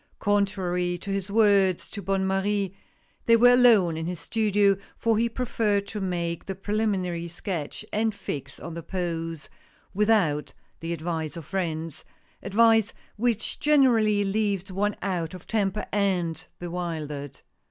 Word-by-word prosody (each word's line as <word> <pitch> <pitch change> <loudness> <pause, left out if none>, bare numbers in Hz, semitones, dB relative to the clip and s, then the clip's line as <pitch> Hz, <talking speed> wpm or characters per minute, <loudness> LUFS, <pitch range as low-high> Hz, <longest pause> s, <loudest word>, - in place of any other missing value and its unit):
Contrary 190 -3 0
to 195 +3 -6
his 195 0 -2
words 200 -4 +3
to 205 - -7
Bonne 195 +1 0
Marie 195 0 0 0.5
they 230 - +7
were 245 +2 +7
alone 225 -9 +5
in 160 +1 -3
his 180 -2 -4
studio, 205 +1 +2 0.2
for 230 -1 +2
he 230 +2 +2
preferred 220 -4 0
to 210 0 -6
make 170 -3 -2
the 195 - -3
pre 205 +2 -4
liminary 180 -6 -1
sketch 175 +1 -5
and 220 0 +1
fix 140 -8 -6
on 170 - -7
the 170 - -5
pose 165 -3 -4 0.5
without 180 -9 +2 0.3
the 165 +1 -4
advice 160 -1 -3
of 165 - -8
friends 165 -4 -3 0.2
— - - -37
advice 225 +2 +3 0.2
which 230 0 -1
generally 235 -9 +4
leaves 200 -1 -1
one 205 +2 0
out 180 -3 -2
of 180 - -11
temper 210 -2 -1
and 185 -5 0
bewildered. 160 -5 -5
195 Hz, 145 wpm, -26 LUFS, 170-210 Hz, 0.5 s, they